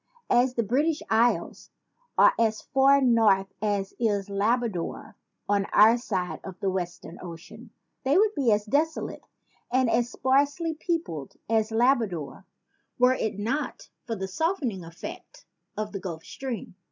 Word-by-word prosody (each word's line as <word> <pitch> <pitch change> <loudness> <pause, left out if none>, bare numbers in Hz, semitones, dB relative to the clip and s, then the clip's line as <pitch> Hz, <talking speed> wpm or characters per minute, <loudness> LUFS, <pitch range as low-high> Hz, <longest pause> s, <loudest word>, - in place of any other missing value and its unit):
As 245 +1 +3
the 235 - +1
British 290 +9 0
Isles 230 +2 +1 0.5
are - - +7
as 220 -2 +2
far 275 +1 +4
north 215 -6 +3
as 205 -2 -1
is 205 -4 0
Labrador 210 -2 -1 0.3
on 200 -1 +2
our 220 +2 +7
side 185 -7 -3
of 190 -2 -9
the 195 - 0
Western 175 -2 -5
Ocean, 185 +7 -10 0.3
they 275 +5 +3
would 420 +1 +4
be 265 - +2
as 210 0 +2
desolate 305 +8 -1 0.5
and 255 -2 +2
as 240 0 +1
sparsely 285 +6 +1
peopled 315 - -3
as 220 -1 +1
Labrador 225 - 0 0.5
were 250 +1 +5
it 220 -5 -2
not 230 +9 -3 0.2
for 230 - -2
the 190 -2 -4
softening 255 - -1
effect 165 +1 -10 0.3
of 215 0 -3
the 195 - -5
Gulf 170 -4 -6
Stream. 255 -9 -6
225 Hz, 140 wpm, -26 LUFS, 195-260 Hz, 0.5 s, are